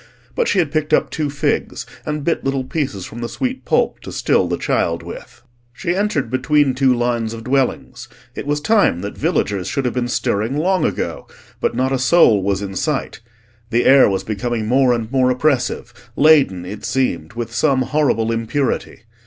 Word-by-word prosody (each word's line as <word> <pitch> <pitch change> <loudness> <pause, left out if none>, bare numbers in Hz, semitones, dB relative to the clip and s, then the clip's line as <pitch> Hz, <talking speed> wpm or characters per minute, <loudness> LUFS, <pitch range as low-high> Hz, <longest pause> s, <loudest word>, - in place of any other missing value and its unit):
But 485 - 0
she 205 - +1
had 165 -6 +1
picked 155 -1 -1
up - - -1
two 150 -2 -2
figs, 145 0 -2 0.2
and 150 -1 -2
bit 165 - -1
little 135 -1 -1
pieces 130 - -3
from 120 - -9
the 120 - -3
sweet 260 0 -4
pulp - - +1
to - - -9
still - - +1
the - - -2
child - - -1
with. - - -10 0.3
She 175 +6 -2
entered 185 - -1
between 140 +1 +2
two 135 0 +2
lines 120 -2 -1
of 115 - -9
dwellings. 130 +1 -1 0.3
It - - -7
was 145 0 0
time 205 - +2
that 100 +1 -6
villagers 100 -3 -1
should 140 - -2
have 125 - 0
been 125 -1 -1
stirring 115 +2 -1
long 185 +4 +1
ago, - - -3 0.3
but - - -1
not 130 +2 0
a 135 - 0
soul 130 - +4
was 100 +1 -1
in 95 -1 -6
sight. - - -2 0.5
The 120 +1 +1
air 135 -3 +7
was 95 -1 -1
becoming 110 +1 -3
more 130 +3 +3
and 115 -1 -2
more 130 -2 +3
oppressive, 130 -1 0 0.2
laden, 140 - +4
it 100 +3 -8
seemed, 105 -10 -1
with 115 0 -5
some 130 +2 +2
horrible 130 -4 +1
impurity. 115 +5 -2
130 Hz, 185 wpm, -19 LUFS, 115-150 Hz, 0.5 s, air